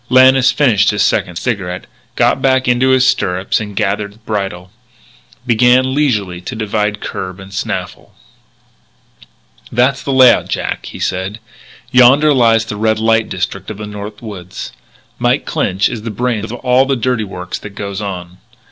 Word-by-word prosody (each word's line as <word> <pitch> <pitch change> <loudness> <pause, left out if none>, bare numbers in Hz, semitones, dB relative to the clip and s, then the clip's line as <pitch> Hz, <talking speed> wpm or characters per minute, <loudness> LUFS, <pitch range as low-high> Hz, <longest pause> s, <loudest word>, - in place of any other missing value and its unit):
Lannis 130 +1 +6
finished 115 -9 +3
his 105 -1 +1
second 90 - 0
cigarette, 90 -4 -3 0.3
got - - +2
back 130 -1 +2
into 125 +2 +3
his 130 -1 +4
stirrups 95 -5 0
and, 105 -2 -7
gathering 100 +1 -2
bridle, 95 -4 -4 0.7
began 125 +2 +3
leisurely 105 -12 0
to 120 +7 -6
divide 105 -1 -2
curb 95 0 -5
and 95 0 -11
snaffle. 95 - -5 1.6
"That's 125 +2 +2
the 140 - -3
layout, 130 -2 +5
Jack," - - -3
he - - -9
said. 95 +3 -3 0.5
"Yonder 135 +4 +6
lies 115 -3 +3
the 105 - -6
Red 110 +1 +1
Light 115 0 +1
district - - -4
of 110 - -6
the 105 - -6
North 105 +1 -8
Woods. 90 - -8 0.5
Mike - - +1
Clinch 95 +2 0
is 115 -3 -5
the 115 - -5
brains 115 0 -2
of - - -6
all 125 +2 +2
the 135 - +1
dirty 125 -2 0
work 90 -2 -8
that 100 0 -10
goes 100 0 -5
on. 90 -3 -6
110 Hz, 155 wpm, -15 LUFS, 100-125 Hz, 1.6 s, Lannis